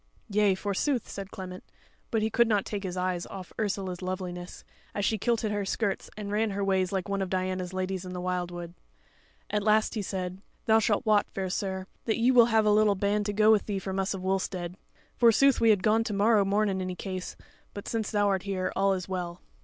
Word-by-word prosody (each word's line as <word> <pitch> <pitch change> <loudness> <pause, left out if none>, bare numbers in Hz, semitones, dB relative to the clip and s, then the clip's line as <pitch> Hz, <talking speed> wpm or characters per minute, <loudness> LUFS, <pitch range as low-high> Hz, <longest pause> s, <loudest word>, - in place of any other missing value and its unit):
"Yea, 205 -1 +3
forsooth," 205 +7 -1
said 195 -1 -7
Clement; 185 -2 -8 0.5
but 225 -2 0
he 220 - 0
could 235 0 +4
not 210 -3 +2
take 205 -2 -4
his 185 -2 -4
eyes 180 -1 -1
off 190 -2 -9
Ursula's 195 -4 -2
loveliness, 180 -1 -5 0.3
as 205 - 0
she 220 - +1
kilted 225 -1 0
her 205 -1 -1
skirts 200 0 -2
and 205 -1 -5
ran 215 +1 +1
her 200 0 -2
ways 190 -2 +1
like 190 -2 -2
one 200 -1 -1
of 190 - -2
Diana's 185 -1 -2
ladies 185 0 -2
in 185 - -7
the 180 - -5
wildwood. 175 -1 -3 0.8
At 210 0 +1
last 215 +1 +3
he 215 - -2
said, 185 -1 -4 0.2
"Thou 220 0 +5
shalt 215 +2 +1
wot, 210 -2 +3
fair 190 -1 -3
sir, 190 -1 -2 0.2
that 220 - +1
ye 240 +3 +4
will 240 -2 +7
have 220 -2 +3
a 210 - +5
little 210 -1 +4
band 205 +2 0
to 205 - -1
go 215 +1 +5
with 215 -2 +3
thee 205 -2 -1
from 190 0 -3
us 195 +1 0
of 185 - -7
Wulstead; 185 -2 -2 0.4
forsooth 250 +3 +5
we 230 - +5
had 205 -4 +4
gone 220 +1 +3
to 215 - -2
morrow 205 +1 +4
morn 205 +2 +2
in 190 -1 -1
any 185 -1 -3
case, 185 0 -5 0.4
but 205 - -7
since 225 -2 -2
thou 205 -2 +2
art 195 -2 +1
here, 185 -2 -2
all 195 0 +3
is 180 -2 -5
well." 180 -2 -4
195 Hz, 225 wpm, -28 LUFS, 185-215 Hz, 0.8 s, will